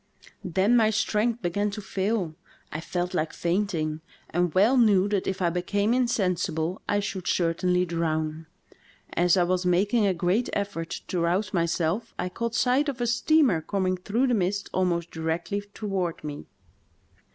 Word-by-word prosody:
Then 190 +6 +2
my 220 -2 +5
strength 220 +2 0
began 205 +4 0
to 200 - -6
fall; 195 -3 -1 0.4
I 155 - -4
felt 180 +2 -3
like 160 -3 -1
fainting, 170 -4 -1 0.3
and 175 0 +1
well 210 +8 +5
knew 205 -6 +4
that 200 -2 -1
if 190 -1 -2
I 170 - +2
became 200 +5 0
insensible 180 -8 0
I 205 - +2
should 195 -3 -4
certainly 180 +1 +1
drown. 160 -2 -2 0.3
" - - -32 0.3
As 175 +1 +3
I 180 - +4
was 180 +1 0
making 200 +5 +2
a 190 - +2
great 180 +8 +1
effort 195 -5 -3 0.2
to 180 - -1
rouse 180 +4 0
myself 170 +4 0
I 180 - -2
caught 235 +5 -3
sight 265 +4 +2
of 265 -3 -5
a 240 - 0
steamer 240 - +3
coming 185 +1 0
through 205 +8 0
the 250 - +1
mist 200 -1 -1
almost 175 -2 0
directly 165 +5 -2
toward 190 -7 -3
me. 145 -1 -6
185 Hz, 165 wpm, -26 LUFS, 170-210 Hz, 0.4 s, my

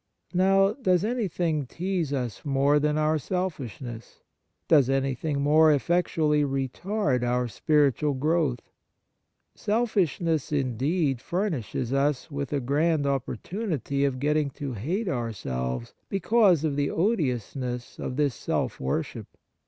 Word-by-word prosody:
Now, 195 +2 +4
does 190 -7 +1
anything 175 - -1
tease 175 -1 -2
us 125 -7 -3
more 140 +1 +3
than 150 +1 +1
our 155 0 +2
selfishness? 130 - -5 0.5
Does 140 -5 +5
anything 135 +2 0
more 155 +2 +6
effectually 155 0 +2
retard 135 - -1
our 125 0 0
spiritual 145 +2 +2
growth? 150 -3 +1 0.9
Selfishness, 180 - 0
indeed, 135 +1 0
furnishes 140 - -2
us 140 +2 0
with 140 -1 -4
a 145 - +1
grand 145 +4 +1
opportunity 140 - -2
of 135 -2 +1
getting 150 +1 +1
to 140 -4 -4
hate 170 - -2
our 120 -8 -1
selves, 65 - -4 0.2
because 195 -4 +3
of 150 -3 0
the 145 -1 +1
odiousness 130 - -2
of 125 - -4
this 145 -2 +1
self - - -2
worship. 65 +1 -3
145 Hz, 120 wpm, -26 LUFS, 130-170 Hz, 0.9 s, more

